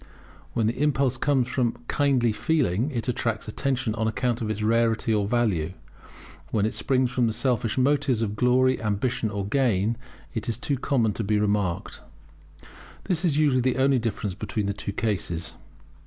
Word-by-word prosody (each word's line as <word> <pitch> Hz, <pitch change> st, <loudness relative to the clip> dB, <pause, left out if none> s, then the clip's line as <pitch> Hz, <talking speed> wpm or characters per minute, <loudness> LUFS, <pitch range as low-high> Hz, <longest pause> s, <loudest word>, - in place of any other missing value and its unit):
When 115 Hz, -, +1 dB
the 115 Hz, +5 st, -1 dB
impulse 140 Hz, -3 st, +2 dB
comes 130 Hz, -2 st, +1 dB
from 120 Hz, -2 st, 0 dB
kindly 135 Hz, -5 st, +2 dB
feeling 125 Hz, -, +1 dB
it 120 Hz, -6 st, -3 dB
attracts 115 Hz, -3 st, -1 dB
attention 125 Hz, 0 st, -1 dB
on 110 Hz, 0 st, -1 dB
account 120 Hz, +1 st, -1 dB
of 110 Hz, -, -2 dB
its 110 Hz, 0 st, -2 dB
rarity 115 Hz, +1 st, +2 dB
or 105 Hz, -2 st, +1 dB
value; 100 Hz, -8 st, 0 dB, 0.8 s
when 105 Hz, +4 st, +1 dB
it 110 Hz, -, -1 dB
springs 130 Hz, -2 st, +1 dB
from 125 Hz, -1 st, +2 dB
the 110 Hz, -, -1 dB
selfish 115 Hz, -1 st, 0 dB
motives 130 Hz, -3 st, +2 dB
of 105 Hz, -1 st, -2 dB
glory, 130 Hz, +2 st, +3 dB
ambition, 110 Hz, +2 st, -1 dB
or 100 Hz, -1 st, -3 dB
gain, 115 Hz, -2 st, +1 dB, 0.4 s
it 115 Hz, -1 st, -3 dB
is 115 Hz, -, -1 dB
too 140 Hz, +3 st, -1 dB
common 115 Hz, -6 st, +1 dB
to 115 Hz, -, -3 dB
be 105 Hz, +1 st, +1 dB
remarked. 100 Hz, -4 st, -1 dB, 1.0 s
This 175 Hz, -2 st, -1 dB
is 155 Hz, -5 st, +2 dB
usually 145 Hz, -4 st, +3 dB
the 130 Hz, 0 st, +1 dB
only 135 Hz, 0 st, +3 dB
difference 110 Hz, -4 st, -2 dB
between 105 Hz, +3 st, -3 dB
the 100 Hz, -, -1 dB
two 100 Hz, 0 st, -5 dB
cases. 95 Hz, -6 st, -2 dB
115 Hz, 170 wpm, -25 LUFS, 105-130 Hz, 1.0 s, glory